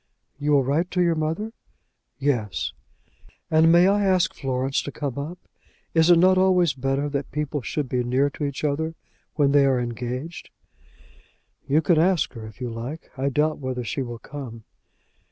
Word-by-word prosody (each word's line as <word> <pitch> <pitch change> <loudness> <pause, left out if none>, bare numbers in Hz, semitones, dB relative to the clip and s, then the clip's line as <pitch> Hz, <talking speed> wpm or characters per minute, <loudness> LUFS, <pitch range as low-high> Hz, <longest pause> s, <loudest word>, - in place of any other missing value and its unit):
"You 145 +1 +1
will 140 -2 +5
write 150 +7 0
to 180 - +1
your 170 -1 +3
mother?" 165 +8 -2 0.6
"Yes." 125 -8 -1 0.8
"And 160 +1 +5
may 175 +1 +6
I 205 +1 +3
ask 190 -1 +2
Florence 135 0 -1
to 145 - -6
come 140 -3 -4
up? 160 +6 -5 0.6
Is 160 +1 +4
it 175 - +8
not 185 +2 +5
always 180 -5 +4
better 135 +2 -1
that 140 -1 -3
people 150 -1 -3
should 130 +6 -3
be 125 -1 0
near 130 +4 +1
to 150 - -6
each 140 0 -4
other 160 +2 -1 0.4
when 140 -2 +3
they 145 0 +5
are 135 -2 +3
engaged?" 125 +6 -5 1.2
"You 150 +3 +3
can 155 +1 +4
ask 175 -3 +2
her, 110 -3 -8
if 110 - -14
you 125 -2 -4
like. 120 +8 -7
I 135 +1 0
doubt 150 +3 +1
whether 130 -2 -3
she 135 - -3
will 120 -2 -5
come." 120 -3 -9
145 Hz, 175 wpm, -24 LUFS, 130-160 Hz, 1.2 s, it